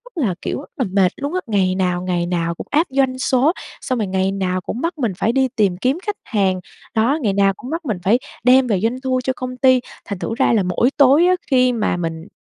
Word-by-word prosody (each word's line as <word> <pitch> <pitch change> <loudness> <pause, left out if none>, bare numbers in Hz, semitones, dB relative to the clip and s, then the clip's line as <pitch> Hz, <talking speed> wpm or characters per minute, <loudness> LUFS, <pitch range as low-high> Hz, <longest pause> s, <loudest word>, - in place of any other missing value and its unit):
rất 320 - -1
là, 185 -5 -1
kiểu, - - -3
rất 285 - -11
là 260 - 0
mệt 190 -2 +3
luôn 285 +3 -4
á, 370 - +1
ngày 190 -4 +1
nào, 180 -2 0
ngày 175 -2 -1
nào 170 -1 -1
cũng - - -8
áp 310 +4 +2
doanh 265 -1 +1
số, 260 +3 +3 0.3
xong 255 - -2
rồi 210 - -1
ngày 190 0 0
nào 185 -1 -1
cũng 230 +6 -5
bắt 335 0 -2
mình 240 -7 0
phải 220 - +1
đi 265 +1 +2
tìm 195 -5 +2
kiếm 255 - 0
khách 415 -1 -2
hàng, 195 -5 0 0.3
đó, 235 +7 +2
ngày 210 -6 +1
nào 195 0 +3
cũng 250 - -9
bắt 330 +2 -4
mình 220 -8 -1
phải 225 +6 +3 0.2
đem 255 +1 +5
về 205 -5 +1
doanh 230 +6 -1
thu 260 -1 0
cho 260 - 0
công 255 0 -6
ty. 255 0 +5 0.3
Thành 200 -3 -5
thử 225 - -3
ra - - +3
là 215 -4 +3
mỗi 180 +7 +1
tối 285 +4 +6
á, 365 - +4 0.2
khi 255 -1 +4
mà 210 -6 0
mình, 165 0 -4
230 Hz, 255 wpm, -19 LUFS, 190-260 Hz, 0.3 s, tối